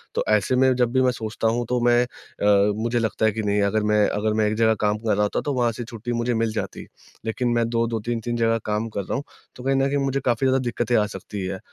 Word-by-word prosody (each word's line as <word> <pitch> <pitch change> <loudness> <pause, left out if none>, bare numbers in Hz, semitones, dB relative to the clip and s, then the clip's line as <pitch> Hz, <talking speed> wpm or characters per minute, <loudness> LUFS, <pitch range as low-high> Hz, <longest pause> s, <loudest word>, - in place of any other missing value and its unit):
तो - - +1
ऐसे 105 +3 +2
में 130 0 +4
जब 125 -1 +1
भी 130 +1 +2
मैं 130 -1 +3
सोचता 110 -1 -3
हूँ 120 +2 0
तो 125 0 +1
मैं 120 0 +5
अ, 105 -4 +1
मुझे 120 +1 0
लगता 110 -1 0
है 110 - +4
कि 110 +1 -3
नहीं 105 0 +1
अगर 105 +2 +1
मैं 105 -1 +3
अगर 105 +1 -1
मैं 110 0 +2
एक 105 - -1
जगह 110 0 +3
काम 105 0 +1
कर 110 0 0
रहा 105 +1 +2
होता, 105 - 0
तो 145 - -2
वहाँ 120 -2 +1
से 120 +2 -6
छुट्टी 115 0 -6
मुझे 120 +1 0
मिल 115 -1 0
जाती। - - -5 0.4
लेकिन 115 +3 -1
मैं 115 -1 +2
2-2 115 -1 0
3-3 120 0 -2
जगह 115 0 +2
काम 105 +1 -1
कर 100 - -3
रहा - - -3
हूँ, 140 - -2 0.3
तो 125 - -10
कहीं 135 +1 +1
न 135 0 +2
कहीं 140 - 0
मुझे 135 0 0
काफ़ी 120 +2 +2
ज़्यादा 130 0 +3
दिक्कतें 120 -1 -1
आ 105 - +3
सकती 95 +1 -6
है, 95 0 -4
115 Hz, 270 wpm, -23 LUFS, 105-120 Hz, 0.4 s, मैं